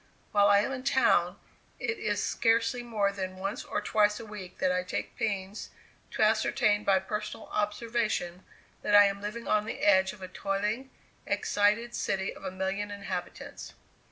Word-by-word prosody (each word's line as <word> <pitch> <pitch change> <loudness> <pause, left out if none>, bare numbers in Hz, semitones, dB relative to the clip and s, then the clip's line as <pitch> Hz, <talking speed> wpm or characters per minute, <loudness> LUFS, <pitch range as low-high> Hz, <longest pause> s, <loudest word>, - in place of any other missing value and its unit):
While 205 -1 +5
I 200 0 +6
am 240 - -2
in 260 -1 -5
town, 180 -9 +3 0.4
it 445 - -2
is - - -1
scarcely 230 +1 +2
more 215 -4 0
than 190 -2 -5
once 195 +2 -4
or 210 - -3
twice 210 0 +2
a 230 - -8
week 210 -4 -9
that 185 - +1
I 180 0 +1
take 185 - -4
pains 200 -1 -3 0.4
to - - 0
ascertain 215 -1 +2
by 195 -2 +4
personal 210 +3 -5
observation 210 -4 -1 0.4
that 205 - +2
I 205 0 +9
am 200 0 -1
living 215 +3 -5
on 210 0 +2
the - - -5
edge 190 -2 +4
of 195 - -12
a - - -5
toiling, 210 +7 -2 0.4
excited 210 +4 +1
city 190 -4 -1
of - - -14
a 190 - -2
million 190 +2 -3
inhabitants. 195 -3 -6
205 Hz, 170 wpm, -29 LUFS, 190-220 Hz, 0.4 s, I